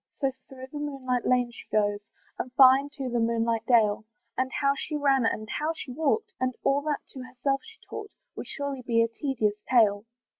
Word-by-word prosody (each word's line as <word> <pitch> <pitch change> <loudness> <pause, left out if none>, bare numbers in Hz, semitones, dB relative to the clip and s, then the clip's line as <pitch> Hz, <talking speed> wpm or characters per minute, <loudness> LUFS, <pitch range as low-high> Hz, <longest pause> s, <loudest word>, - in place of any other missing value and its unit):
So, 275 -2 +1 0.2
through 260 -1 -9
the 295 - -5
moonlight 265 -4 -2
lane 245 -1 +2
she - - -12
goes, 205 -1 +2 0.4
And 255 - -3
far 260 0 +8
into 280 -1 -6
the 240 -1 0
moonlight 230 0 0
dale; 215 -4 +4 0.3
And 260 0 -1
how 275 -1 +2
she 300 - -4
ran, 275 -5 +3
and 215 -1 -2
how 305 +8 -1
she 275 - -7
walked, 365 - 0
And 255 -1 -1
all 275 +1 +3
that 300 -2 -1
to 260 - -7
herself 260 +2 -2
she 445 - -14
talked, 420 -1 -7 0.3
Would - - -7
surely 280 -2 -4
be 230 -2 +2
a - - +1
tedious 225 -4 -1
tale. 215 -4 +4
255 Hz, 195 wpm, -27 LUFS, 230-280 Hz, 0.4 s, far